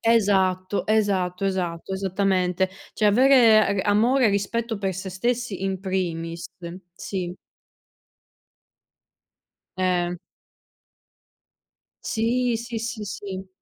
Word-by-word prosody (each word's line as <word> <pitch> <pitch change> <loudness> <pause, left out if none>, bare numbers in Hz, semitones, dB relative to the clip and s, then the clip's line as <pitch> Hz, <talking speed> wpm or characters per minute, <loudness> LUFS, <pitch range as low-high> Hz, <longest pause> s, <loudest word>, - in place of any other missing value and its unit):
Esatto. 195 -4 +2
Esatto. 195 -4 +1
Esatto. 185 -2 -2
Esattamente. 190 -1 0 0.2
Cioè, 215 - +3
avere 220 -4 +5
a 205 - +1
amore 240 +5 +4
e - - +4
rispetto 220 +3 -1
per 195 -2 -2
se 190 +1 -5
stessi 230 +1 -2
in 190 -1 -2
primis, 170 -3 -3 0.5
sì. 180 -1 -5 2.4
Eh. 180 -1 0 1.9
Sì, 235 +1 0
sì, 235 0 -5
sì, 220 -1 -4
sì. 190 -1 -6
195 Hz, 95 wpm, -24 LUFS, 185-225 Hz, 2.4 s, avere